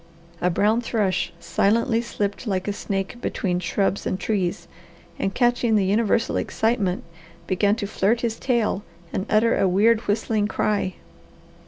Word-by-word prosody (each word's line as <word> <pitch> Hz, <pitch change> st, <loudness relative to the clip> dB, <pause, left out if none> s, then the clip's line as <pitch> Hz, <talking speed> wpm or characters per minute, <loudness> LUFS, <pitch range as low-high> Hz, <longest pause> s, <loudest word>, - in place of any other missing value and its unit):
A 180 Hz, -, +3 dB
brown 210 Hz, +6 st, +2 dB
thrush 205 Hz, -7 st, 0 dB
silently 225 Hz, +6 st, +1 dB
slipped 210 Hz, 0 st, -3 dB
like 190 Hz, -2 st, -1 dB
a 205 Hz, -, 0 dB
snake 200 Hz, +4 st, -4 dB
between 180 Hz, -6 st, -1 dB
shrubs 195 Hz, +3 st, -1 dB
and 185 Hz, -, -2 dB
trees, 180 Hz, -5 st, -1 dB, 0.5 s
and 195 Hz, -, 0 dB
catching 240 Hz, -2 st, +2 dB
the 200 Hz, -2 st, +3 dB
universal 225 Hz, +3 st, +1 dB
excitement, 215 Hz, -5 st, 0 dB, 0.4 s
began 200 Hz, +3 st, +2 dB
to 225 Hz, -3 st, -3 dB
flirt 215 Hz, +3 st, +1 dB
his 230 Hz, -2 st, -2 dB
tail 235 Hz, -6 st, +1 dB, 0.3 s
and 190 Hz, -, -2 dB
utter 220 Hz, +2 st, +3 dB
a 195 Hz, -, +2 dB
weird, 215 Hz, +5 st, +4 dB
whistling 210 Hz, 0 st, +1 dB
cry. 205 Hz, -3 st, -1 dB
210 Hz, 145 wpm, -23 LUFS, 195-230 Hz, 0.5 s, weird